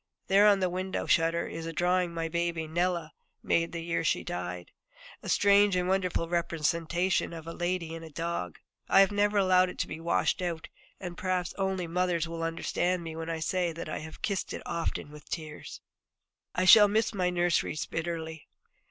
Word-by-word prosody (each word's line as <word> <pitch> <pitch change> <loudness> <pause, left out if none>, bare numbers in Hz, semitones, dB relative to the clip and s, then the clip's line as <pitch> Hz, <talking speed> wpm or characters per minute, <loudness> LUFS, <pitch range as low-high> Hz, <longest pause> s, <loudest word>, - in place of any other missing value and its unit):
There 200 +2 +5
on 200 -2 +5
the 185 - +3
window 185 +1 -3
shutter 165 0 +2
is 165 0 -6
a 165 - -5
drawing 180 +1 +1
my 165 -1 -3
baby, 170 0 -1
Nella, 170 0 -1 0.3
made 165 0 +1
the 170 -1 -5
year 170 0 -1
she 160 - +1
died, 90 0 -5 0.5
a - - -7
strange 200 -1 +5
and 180 0 0
wonderful 185 -3 0
representation 170 +1 0
of 165 -1 -8
a 165 - -6
lady 175 -2 -2
and 165 0 -7
a 160 - -9
dog. 165 - -4 0.3
I 195 - +7
have 195 - +4
never 205 0 +2
allowed 185 -2 +4
it - - -9
to - - -1
be 155 - -6
washed 170 +2 +1
out, 170 -3 -3 0.3
and 175 -2 -7
perhaps 185 -1 -1
only 190 -2 -1
mothers 170 -1 0
will 165 0 -5
understand 170 +2 -1
me 165 -1 -6
when 165 0 -5
I 165 -1 -3
say 175 +1 0
that 165 - -6
I - - -3
have 155 0 -10
kissed 200 -4 -2
it - - -6
often 165 -3 -3
with 150 0 -13
tears. 155 -2 -7 0.7
I 185 - +1
shall 210 +3 +9
miss 220 +2 +1
my 180 -3 +1
nurseries 175 -3 0
bitterly. 160 -2 -5
170 Hz, 190 wpm, -29 LUFS, 165-185 Hz, 0.7 s, shall